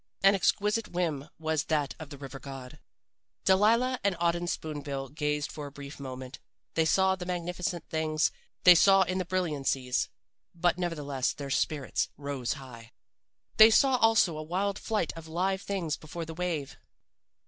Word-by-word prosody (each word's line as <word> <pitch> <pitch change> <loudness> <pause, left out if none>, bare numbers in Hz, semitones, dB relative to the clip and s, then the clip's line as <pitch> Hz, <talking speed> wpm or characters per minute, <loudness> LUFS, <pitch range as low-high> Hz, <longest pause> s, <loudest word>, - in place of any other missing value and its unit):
"An 195 +1 +7
exquisite 210 +3 +1
whim, 160 -5 -2
was 160 -1 -1
that 150 -3 0
of 160 -3 -8
the 140 - -9
river 135 -1 -8
god. 135 -2 -9 0.7
"Delilah 230 +6 +4
and 200 -2 +2
Auden 170 +1 0
Spoon 155 -3 -4
bill 135 -2 -5
gazed 150 0 -2
for 150 -2 -6
a - - -10
brief 140 0 -10
moment. 130 -1 -7 0.3
They 160 - +2
saw 190 +3 +3
the 180 -1 -7
magnificent 180 -1 -3
things. 155 0 +1 0.3
They 180 - +10
saw 195 +2 +6
death 185 - -3
in 185 - -1
the 185 - -2
brilliancies, 140 -8 -1 0.5
but 175 +1 +1
nevertheless 145 -7 -1
their 140 -2 -6
spirits 145 0 0
rose 140 -4 -3
high. 125 -5 -11 0.6
They 220 +1 +10
saw 260 +3 +4
also 225 -8 +4
a - - -3
wild 190 +5 -1
flight 215 -7 -1
of 165 -1 -9
live 185 +4 -1
things 180 -6 -2
before 165 +2 -7
the 160 - -7
wave. 165 -5 -3
160 Hz, 165 wpm, -29 LUFS, 145-185 Hz, 0.7 s, They